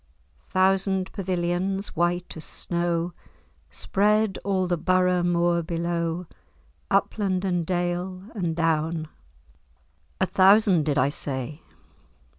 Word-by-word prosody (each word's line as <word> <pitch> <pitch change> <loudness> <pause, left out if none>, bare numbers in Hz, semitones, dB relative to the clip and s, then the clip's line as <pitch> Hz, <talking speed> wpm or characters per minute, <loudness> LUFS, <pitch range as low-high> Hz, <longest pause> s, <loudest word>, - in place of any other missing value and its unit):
"Thousand 190 0 +1
pavilions, 185 +1 -1
white 175 +1 0
as 160 - -7
snow, 170 0 -2 0.6
Spread 210 - +1
all 190 -1 +1
the 175 -1 +1
Borough 180 +1 +2
moor 175 0 +2
below, 170 0 -2 0.6
Upland, 195 -3 +1
and 175 -2 0
dale, 180 +1 -2
and 175 -7 -2
down:— 160 -1 0 1.1
A 190 - +3
thousand, 190 -4 +4
did 145 -1 +1
I 135 +1 +3
say? 140 +1 -4
175 Hz, 100 wpm, -25 LUFS, 170-190 Hz, 1.1 s, thousand